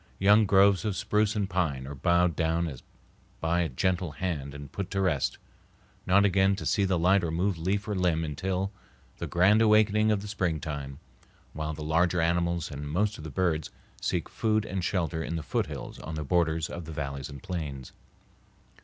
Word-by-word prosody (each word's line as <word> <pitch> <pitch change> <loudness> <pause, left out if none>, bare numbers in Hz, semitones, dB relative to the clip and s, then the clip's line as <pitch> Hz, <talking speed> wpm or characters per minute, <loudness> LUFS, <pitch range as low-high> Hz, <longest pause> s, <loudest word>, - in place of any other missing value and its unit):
Young 105 +2 +5
groves 100 0 +5
of 105 -3 -1
spruce 105 +1 +1
and 100 -2 0
pine 80 -9 -1
are 70 - -6
bowed 85 +4 +2
down 85 +1 0
as 70 -5 -7 0.6
by 85 +2 +1
a 85 - 0
gentle 90 +4 -1
hand 75 -4 -3
and 70 -1 -9
put 100 -3 -4
to 95 - -2
rest, 85 -8 0 0.7
not 100 +2 +5
again 95 0 +3
to 95 - -6
see 100 - +2
the 95 -1 +1
light 95 +3 +3
or 85 - -1
move 90 +4 0
leaf 100 +5 -1
or 105 - -1
limb 90 -4 +1
until 95 +5 -2 0.5
the - - -3
grand 100 +5 +4
awakening 105 0 +4
of 100 -2 0
the - - -6
springtime, 75 -8 -3 0.6
while 75 0 -3
the 75 - -6
larger 85 +3 +2
animals 85 0 0
and 70 0 -6
most 105 +7 0
of - - -8
the 80 - -6
birds 80 -2 0 0.3
seek - - -1
food 110 -1 0
and 95 -1 -3
shelter 85 -4 -1
in 85 - -3
the 80 - -3
foothills - - -3
on 80 - -6
the 75 - -3
borders 80 0 +1
of 85 -1 -7
the 80 - -7
valleys 70 -2 -4
and 70 -2 -10
plains. 75 -8 -5
85 Hz, 190 wpm, -28 LUFS, 80-95 Hz, 0.7 s, Young